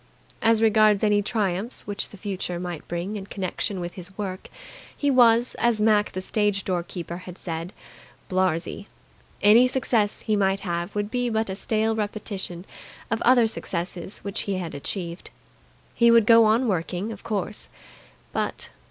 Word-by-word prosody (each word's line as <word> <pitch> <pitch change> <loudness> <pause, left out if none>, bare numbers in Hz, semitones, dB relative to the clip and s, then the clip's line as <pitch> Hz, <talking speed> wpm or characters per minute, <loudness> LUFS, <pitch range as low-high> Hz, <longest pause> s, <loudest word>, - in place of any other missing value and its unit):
As 225 0 +4
regards 215 -2 +4
any 210 -1 +4
triumphs 205 +1 -1
which 205 -1 -2
the 205 - -13
future 185 -3 -4
might 175 -3 -6
bring 175 +5 -3
in 195 -1 -8
connection 190 0 -3
with 175 0 -5
his 185 +1 -9
work, 190 -3 -5 0.5
he 285 -1 +1
was, 240 -1 +5
as 235 -2 +2
Mac 210 -1 +3
the 185 - -3
stage 205 -1 0
door 180 -2 -1
keeper 170 0 -6
had 180 0 -10
said, 165 +1 -5 0.6
"blarzy". 185 +1 -1 0.6
Any 225 +5 +7
success 235 -5 +1
he 215 - 0
might 195 -1 +1
have 175 +1 -3
would 205 +1 -2
be 245 -1 0
but 220 -3 -1
a - - -3
stale 220 +2 0
repetition 205 -4 -4 0.5
of 225 - 0
other 245 -1 +5
successes 185 -3 -3
which 200 0 -3
he 195 - 0
had 175 -3 -4
achieved. 170 +4 -4 0.6
He 235 -1 +4
would 230 -2 +6
go 230 0 +7
on 225 +4 +3
working, 185 +2 -2
of 210 - -8
course, 210 -1 -4 0.6
but - - -3
205 Hz, 160 wpm, -25 LUFS, 185-220 Hz, 0.6 s, Any